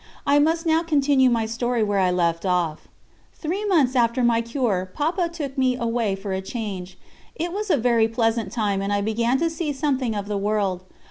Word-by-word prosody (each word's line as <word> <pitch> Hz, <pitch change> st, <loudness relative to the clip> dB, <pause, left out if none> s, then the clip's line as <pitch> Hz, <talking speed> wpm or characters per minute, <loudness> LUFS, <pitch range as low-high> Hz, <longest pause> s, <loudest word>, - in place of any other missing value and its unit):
I 285 Hz, +1 st, +4 dB
must 325 Hz, +3 st, +1 dB
now 320 Hz, 0 st, +3 dB
continue 285 Hz, -5 st, +3 dB
my 230 Hz, -2 st, +1 dB
story 235 Hz, +1 st, -1 dB
where 205 Hz, -1 st, 0 dB
I 185 Hz, -1 st, +3 dB
left 170 Hz, -2 st, 0 dB
off. 175 Hz, -4 st, -1 dB, 0.5 s
Three 360 Hz, +6 st, -3 dB
months 300 Hz, -10 st, +2 dB
after 240 Hz, 0 st, +2 dB
my 235 Hz, -1 st, +3 dB
cure 230 Hz, -6 st, -1 dB
Papa 335 Hz, +4 st, 0 dB
took 280 Hz, -5 st, -5 dB
me 255 Hz, -1 st, +2 dB
away 230 Hz, -4 st, -1 dB
for 195 Hz, 0 st, -5 dB
a 190 Hz, -, -2 dB
change. 190 Hz, -4 st, -6 dB, 0.4 s
It 340 Hz, +2 st, -3 dB
was 420 Hz, +1 st, -3 dB
a 320 Hz, -, +4 dB
very 230 Hz, -2 st, +3 dB
pleasant 225 Hz, -3 st, 0 dB
time, 205 Hz, -4 st, -1 dB
and 200 Hz, +1 st, -2 dB
I 205 Hz, 0 st, +1 dB
began 230 Hz, +4 st, +1 dB
to 335 Hz, -, +1 dB
see 325 Hz, -1 st, -3 dB
something 265 Hz, -5 st, -1 dB
of 205 Hz, -1 st, -4 dB
the 205 Hz, -1 st, -2 dB
world. 200 Hz, -3 st, 0 dB
235 Hz, 200 wpm, -23 LUFS, 205-285 Hz, 0.5 s, I